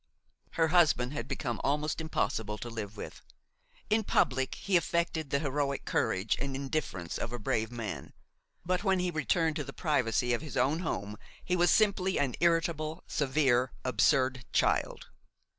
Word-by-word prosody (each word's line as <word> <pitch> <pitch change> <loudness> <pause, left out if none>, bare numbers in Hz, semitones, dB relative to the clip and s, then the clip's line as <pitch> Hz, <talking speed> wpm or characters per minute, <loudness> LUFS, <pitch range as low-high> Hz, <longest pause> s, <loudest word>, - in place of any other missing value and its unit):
Her 165 -1 +2
husband 150 -7 +3
had 145 - -4
become 120 -5 -3
almost 150 +3 0
impossible 110 -9 -1
to 120 +2 -7
live 110 -2 -6
with. - - -8 0.7
In 220 +1 +2
public 130 -8 +1
he 195 - -1
affected 170 -3 0
the 140 - +2
heroic 140 -1 -1
courage 105 -2 +1
and 135 0 -3
indifference 135 - -3
of 115 - -3
a 120 - -3
brave 110 0 -1
man; 115 -5 -6 0.5
but 180 +2 0
when 190 -2 +3
he 180 0 0
returned 160 +1 +1
to 150 - -2
the 135 0 -8
privacy 125 -6 +1
of 120 - 0
his 155 -4 -6
own 140 +6 +2
home 105 - -3 0.3
he 180 - +1
was 175 0 +4
simply 190 -1 +3
an 135 -3 +1
irritable, 165 -2 +1
severe, 130 -3 +1
absurd 130 +1 +2
child. - - +1
140 Hz, 160 wpm, -30 LUFS, 120-165 Hz, 0.7 s, was